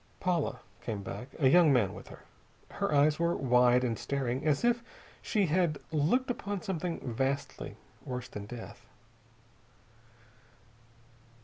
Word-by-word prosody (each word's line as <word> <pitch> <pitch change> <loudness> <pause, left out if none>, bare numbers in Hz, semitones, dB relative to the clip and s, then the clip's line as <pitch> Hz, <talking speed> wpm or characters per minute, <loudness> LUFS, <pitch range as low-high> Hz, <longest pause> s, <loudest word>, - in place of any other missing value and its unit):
Paula 165 -8 0 0.2
came 105 -4 -4
back, 125 - -6
a 140 - +4
young 165 +2 +6
man 120 -8 +3
with - - -10
her. - - -13 0.5
Her - - -2
eyes 150 +1 +4
were 170 0 +2
wide 125 -1 +4
and 115 -3 -1
staring, 135 -1 -2
as 150 +9 +2
if 240 0 +3 0.4
she 210 -4 +1
had 170 -2 +1
looked 210 - +2
upon 205 -5 -4
something 180 -4 -3
vastly 135 +4 -2 0.3
worse 125 -1 -5
than 100 0 -8
death. 120 0 -9
140 Hz, 130 wpm, -31 LUFS, 125-175 Hz, 0.5 s, young